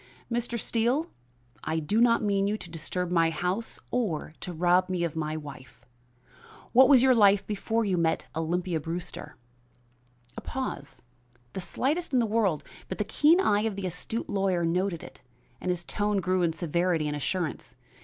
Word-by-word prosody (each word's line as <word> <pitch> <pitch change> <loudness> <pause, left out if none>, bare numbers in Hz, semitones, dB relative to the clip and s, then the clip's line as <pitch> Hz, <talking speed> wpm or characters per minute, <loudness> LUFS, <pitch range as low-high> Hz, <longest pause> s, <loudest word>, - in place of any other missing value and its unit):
"Mr. 235 0 -1
Steele, 240 +10 0 0.5
I 160 +1 -1
do 180 +9 +1
not 230 -1 +4
mean 200 -1 +1
you 210 +1 0
to 170 - -10
disturb 175 +2 -3
my 165 -2 +4
house 180 +7 -2
or 190 -11 -1
to 180 - -5
rob 175 +2 +2
me 180 -2 -1
of 165 -2 -2
my 155 -1 -2
wife. 140 -4 -11 0.9
What 260 +2 +7
was 260 -3 +7
your 260 -1 +6
life 205 -4 +5
before 225 +2 -1
you 190 -3 +1
met 160 -1 +1
Olympia 170 +1 -1
Brewster?" 165 +3 -6 1.0
A - - -6
pause, 255 - -5 0.5
the 190 - -4
slightest 295 - -1
in 255 - +4
the 235 - +3
world, 210 -8 +1 0.3
but 185 - -4
the - - 0
keen 300 - +4
eye 210 - +3
of 220 -2 -1
the 195 -1 -4
astute 185 +6 -4
lawyer 195 -4 0
noted 180 0 -1
it, - - -12 0.4
and 185 - -3
his 180 -1 -1
tone 205 +2 -1
grew 185 0 +1
in 170 -2 +2
severity 170 0 0
and 150 - -2
assurance. 145 -4 -3
185 Hz, 175 wpm, -28 LUFS, 165-220 Hz, 1.0 s, What